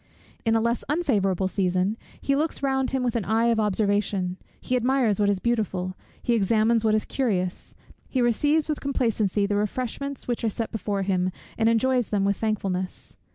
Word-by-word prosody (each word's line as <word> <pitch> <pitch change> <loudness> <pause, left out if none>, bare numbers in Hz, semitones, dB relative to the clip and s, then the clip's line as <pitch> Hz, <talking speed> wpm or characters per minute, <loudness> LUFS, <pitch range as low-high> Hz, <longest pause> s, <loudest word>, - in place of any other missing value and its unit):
In 225 0 +3
a 225 - +3
less 235 +1 0
unfavourable 200 - +1
season, 185 +1 0 0.2
he 275 - +1
looks 300 0 -1
round 265 -1 +1
him 265 -1 -1
with 240 -2 0
an 230 - 0
eye 225 +3 +2
of 230 -1 +2
observation; 205 -3 0 0.2
he 255 - -1
admires 250 -4 +2
what 205 -1 +3
is 200 - +2
beautiful; 190 -5 -1 0.3
he 240 - +2
examines 225 +1 +3
what 215 -1 +3
is 215 - 0
curious; 185 -9 -2 0.3
he 260 - -1
receives 290 +6 +2
with 305 -2 -2
complacency 220 -7 +1
the 205 0 0
refreshments 255 +6 -3
which 240 -1 -2
are 225 - +2
set 225 +2 -4
before 200 -2 -2
him, 185 -1 +1 0.2
and 225 0 +3
enjoys 245 +1 +2
them 200 -2 +1
with 200 -1 +1
thankfulness. 195 -4 -3
220 Hz, 180 wpm, -25 LUFS, 200-245 Hz, 0.3 s, In